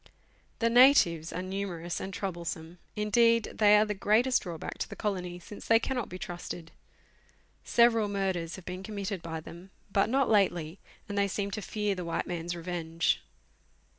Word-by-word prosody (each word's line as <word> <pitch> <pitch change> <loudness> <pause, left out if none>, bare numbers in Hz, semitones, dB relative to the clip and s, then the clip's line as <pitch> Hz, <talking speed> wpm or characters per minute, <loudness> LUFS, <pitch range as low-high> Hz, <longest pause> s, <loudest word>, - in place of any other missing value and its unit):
The 230 - +2
natives 230 - +5
are 180 - -4
numerous 185 -3 -4
and 195 - -5
troublesome; 170 -3 -5 0.2
indeed, 230 +2 +3
they 210 -1 +7
are 210 - +4
the 210 - -2
greatest 220 +6 +3
drawback 170 -4 -6
to - - -3
the - - -7
colony, 180 -4 -3
since 190 +4 -11
they 225 - +6
cannot 245 0 -2
be 185 - -6
trusted. 175 -3 -7 0.9
Several 230 -2 +4
murders 190 -4 -2
ha\ 190 - -9
r - - -24
e - - -36
been - - -9
committed 200 -2 -4
by 160 -1 -5
them, 170 +4 -11 0.2
but 195 - +3
not 270 +2 +2
lately, 180 -5 +1 0.3
and 205 -1 -2
they 200 - +3
seem 200 +1 -3
to 215 - -4
fear 210 +1 -1
the 180 -2 -5
white 170 - -2
man's 175 0 -4
revenge. 165 -1 -1
195 Hz, 175 wpm, -29 LUFS, 175-210 Hz, 0.9 s, they